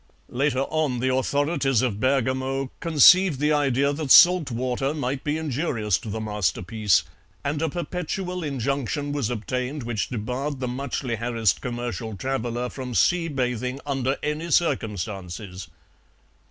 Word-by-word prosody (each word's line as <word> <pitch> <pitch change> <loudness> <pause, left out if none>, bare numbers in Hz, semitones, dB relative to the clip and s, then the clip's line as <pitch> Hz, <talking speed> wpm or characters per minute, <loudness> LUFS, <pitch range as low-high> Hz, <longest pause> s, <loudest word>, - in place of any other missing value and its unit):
Later 135 +1 0
on 145 -3 -1
the 130 +1 +1
authorities 135 -1 +1
of 110 -5 -1
Bergamo 130 +1 0
conceived 165 0 +6
the 150 +1 +2
idea 140 -1 +2
that 145 -1 -4
salt 175 0 +7
water 130 +4 -1
might 135 -2 -3
be 150 +1 -1
injurious 130 - -1
to 110 - -8
the 110 +2 -3
masterpiece, 105 -2 +1 0.4
and 145 +2 -2
a 160 - +1
perpetual 180 +2 -4
injunction 140 +1 -2
was 145 -6 -1
obtained 125 +4 -3
which 115 -3 -2
debarred 130 +5 -3
the 130 - -2
muchly 125 -1 -3
harassed 115 -3 0
commercial 120 -3 -4
traveller 125 0 -2
from 125 -1 -6
sea 175 +5 +3
bathing 125 -2 -2
under 135 -1 -1
any 150 +3 -2
circumstances. 100 - -2
130 Hz, 135 wpm, -24 LUFS, 120-145 Hz, 0.4 s, salt